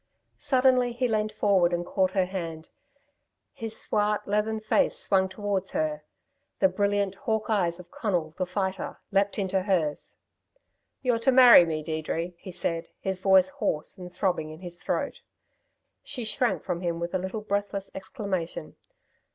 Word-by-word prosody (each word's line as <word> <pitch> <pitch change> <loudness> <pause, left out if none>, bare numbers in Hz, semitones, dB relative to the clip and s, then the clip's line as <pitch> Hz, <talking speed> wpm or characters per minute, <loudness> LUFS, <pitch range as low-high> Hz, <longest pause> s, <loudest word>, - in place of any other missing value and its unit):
Suddenly 255 -3 +3
he 250 +1 0
leant 215 -2 0
forward 190 -4 +3
and 175 0 -1
caught 185 0 0
her 190 -2 +2
hand. 165 -4 -6 0.8
His 225 -1 0
swart, 210 0 0
leathern 210 +2 0
face 215 +6 +2
swung 190 -1 +2
towards 195 -1 -2
her; 155 -1 -1 0.6
the 190 - +4
brilliant, 200 0 0
hawk 220 +2 -2
eyes 175 -5 +1
of 180 - -13
Conal, 175 -8 -2
the 185 - 0
Fighter, 190 0 -3
leapt 200 0 +1
into 190 -1 0
hers. 175 -6 -1 0.9
"You're 245 -3 +2
to 250 +3 +3
marry 250 -9 +9
me, 155 -1 -2
Deirdre," 160 +2 -3
he 190 - -9
said, 165 -1 -2
his 190 -1 -1
voice 190 +1 +5
hoarse 215 - -2
and 180 -1 -8
throbbing 175 -4 -1
in 155 +2 -10
his 175 -1 -5
throat. - - -2 0.8
She 260 -4 -4
shrank 240 +3 0
from 180 -2 -3
him 170 -2 -2
with 170 +1 -4
a 185 - +1
little 190 +4 -4
breathless 200 -1 -2
exclamation. 190 -2 -5
190 Hz, 155 wpm, -27 LUFS, 175-210 Hz, 0.9 s, marry